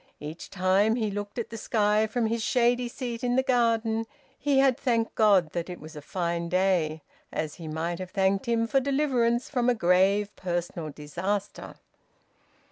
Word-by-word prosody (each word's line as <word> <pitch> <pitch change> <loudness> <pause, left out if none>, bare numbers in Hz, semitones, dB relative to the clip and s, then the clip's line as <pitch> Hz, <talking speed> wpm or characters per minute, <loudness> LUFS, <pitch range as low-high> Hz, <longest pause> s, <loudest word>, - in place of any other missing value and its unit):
Each 150 +3 -8
time 195 +4 +2
he 220 -4 -1
looked 205 +2 -5
at 235 - -4
the 225 - -5
sky 210 -1 +2
from 230 +1 -1
his 225 +1 -1
shady 245 +1 +2
seat 240 0 -5
in 245 0 +1
the 260 - +3
garden 225 -3 +1 0.3
he 285 -2 +1
had 270 -2 +5
thanked 235 -4 0
God 195 -7 +4
that 170 0 -4
it 180 - -7
was 155 +1 -11
a 150 - -7
fine 170 0 -2
day, 175 -5 +1 0.3
as 155 -1 -3
he 160 - -6
might 165 +3 -3
have 185 -1 -6
thanked 195 +1 +1
Him 230 -1 +2
for 270 +4 +2
deliverance 260 -4 +1
from 250 -3 +1
a 245 - +3
grave 195 +2 +2
personal 175 -3 -3
disaster. 185 +8 -4
210 Hz, 175 wpm, -27 LUFS, 175-235 Hz, 0.3 s, had